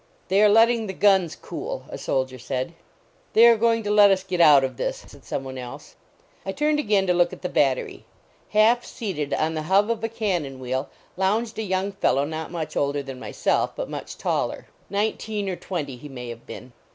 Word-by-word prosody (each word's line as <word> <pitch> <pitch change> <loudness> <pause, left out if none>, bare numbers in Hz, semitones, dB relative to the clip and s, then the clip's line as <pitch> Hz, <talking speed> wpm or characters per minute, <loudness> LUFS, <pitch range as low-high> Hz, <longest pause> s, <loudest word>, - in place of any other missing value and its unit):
"They 195 +2 +4
are 210 - +6
letting 225 +1 +4
the 190 - -4
guns 190 -4 +3
cool," - - -6
a - - -6
soldier 130 -1 -2
said. 130 +5 -3 0.3
" - - -36
They 230 - +7
are 235 -1 +8
going 230 0 +2
to 205 - -1
let 205 -1 +7
us 190 -1 +2
get 185 -2 -1
out 145 -4 +7
of 130 -1 -2
this," - - -4
said - - -16
some - - -4
one 130 -1 -7
else. 125 -1 -9 0.5
I 195 - -4
turned 300 +3 +1
again 205 -8 +2
to 180 - +2
look 175 0 +3
at - - -11
the 180 - -2
battery. 135 -3 0 0.4
Half 225 +3 +4
seated 165 -10 -4
on 160 +1 0
the 155 - -2
hub 200 +4 +4
of 225 -1 -3
a 225 - 0
cannon 175 - -2
wheel 130 +2 -3 0.3
lounged 220 +4 0
a - - 0
young 190 -1 -1
fellow 140 -7 +1
not 160 +1 -5
much 165 -3 -5
older 140 0 0
than 135 -2 -8
myself, - - -1
but - - -4
much - - -7
taller. - - -2 0.2
Nineteen 210 0 -2
or 185 - -2
twenty 150 -9 -5
he 145 +4 -10
may 125 -3 -7
have 115 0 -10
been. 125 -1 -10
185 Hz, 210 wpm, -24 LUFS, 140-215 Hz, 0.5 s, are